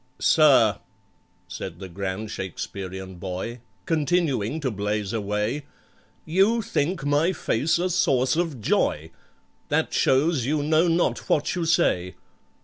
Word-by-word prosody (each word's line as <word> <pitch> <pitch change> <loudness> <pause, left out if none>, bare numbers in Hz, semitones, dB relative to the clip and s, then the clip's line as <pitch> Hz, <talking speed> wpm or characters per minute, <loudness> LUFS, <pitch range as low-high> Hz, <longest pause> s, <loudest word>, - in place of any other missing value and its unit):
"Sir," 130 -9 +4 0.7
said 90 -2 -7
the 95 +1 -8
grand 95 +3 -4
Shakesperian 95 0 -6
boy 95 +6 -5 0.3
(Continuing 155 - 0
to 130 -3 -1
blaze 105 0 -2
away), 105 +6 -2 0.6
"You 200 +8 +2
think 170 -3 -1
my 145 +5 +2
face 150 -1 0
a 180 +2 0
source 135 -7 +2
of 165 -6 -1
joy; 80 -6 0 0.6
That - - 0
shows 135 +1 +2
you 145 +3 0
know 160 +3 +3
not 170 +1 0
what 145 - +1
you 175 -2 -2
say. 125 - +1
130 Hz, 125 wpm, -24 LUFS, 100-160 Hz, 0.7 s, Sir